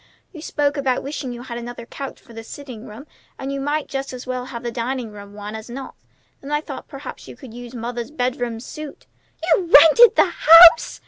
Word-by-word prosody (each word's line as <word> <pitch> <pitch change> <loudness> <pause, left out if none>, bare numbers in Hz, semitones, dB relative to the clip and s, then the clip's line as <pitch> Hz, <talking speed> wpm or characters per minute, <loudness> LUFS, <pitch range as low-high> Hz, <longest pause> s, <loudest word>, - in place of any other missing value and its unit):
You 320 - -11
spoke 290 -1 -1
about 265 -3 -1
wishing 275 -2 -5
you 240 0 -8
had 240 -2 -7
another 240 0 -8
couch 275 +3 -8
for 235 - -18
the 225 0 -9
sitting 250 -2 -10
room, 220 +7 -11 0.3
and 270 +1 -5
you 275 - -4
might 290 +2 -2
just 270 -1 -5
as 250 0 -8
well 255 -1 -4
have 240 -2 -8
the 240 - -4
dining 235 0 -4
room 205 -1 -12
one 210 0 -8
as 220 +1 -9
not. 265 +3 -8 0.5
Then 275 - -10
I 295 - +1
thought 305 - -9
perhaps - - -10
you - - -11
could 260 -6 -13
use 245 +1 -10
mother's 235 0 -5
bedroom 245 -5 -3
suit." 300 +4 -10 0.5
"You've 350 -3 -1
rented 325 +11 +8
the - - +5
house!" 335 +6 +7
255 Hz, 210 wpm, -21 LUFS, 235-285 Hz, 0.5 s, rented